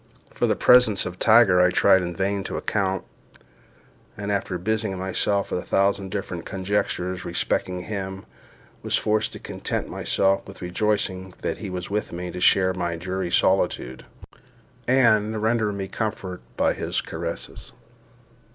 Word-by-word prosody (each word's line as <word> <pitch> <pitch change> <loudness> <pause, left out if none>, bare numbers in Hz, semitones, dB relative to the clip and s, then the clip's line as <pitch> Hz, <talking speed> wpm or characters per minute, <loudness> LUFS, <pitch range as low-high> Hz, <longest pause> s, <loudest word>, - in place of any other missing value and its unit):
For - - +1
the - - +2
presence 125 -5 +5
of 90 0 -6
Tiger 110 -5 +6
I 90 - +5
tried 95 +1 +4
in 85 -1 -4
vain 100 +2 -1
to - - -4
account; 95 -2 -1 1.1
and 100 0 -3
after 100 -2 -1
busying 110 +1 -1
myself 95 +2 0
with - - 0
a - - -7
thousand 100 0 +1
different 95 -4 -4
conjectures 95 -1 -2
respecting 90 +1 -1
him, 95 -1 -5 0.6
was - - +1
forced 110 0 0
to - - -7
content - - -4
myself 95 0 +1
with 100 -1 -11
rejoicing 95 -1 -1
that - - -2
he 105 - -5
was 90 +1 -5
with 105 +1 -2
me 90 +1 -5
to 90 - -6
share 95 0 +5
my 85 -2 -2
dreary 90 +1 -3
solitude, 65 -6 +1 0.8
and 110 -4 +3
render 110 -2 +2
me 100 -1 -4
comfort 95 -3 -4 0.2
by - - +3
his - - -2
caresses. 85 +1 -5
95 Hz, 150 wpm, -24 LUFS, 90-105 Hz, 1.1 s, Tiger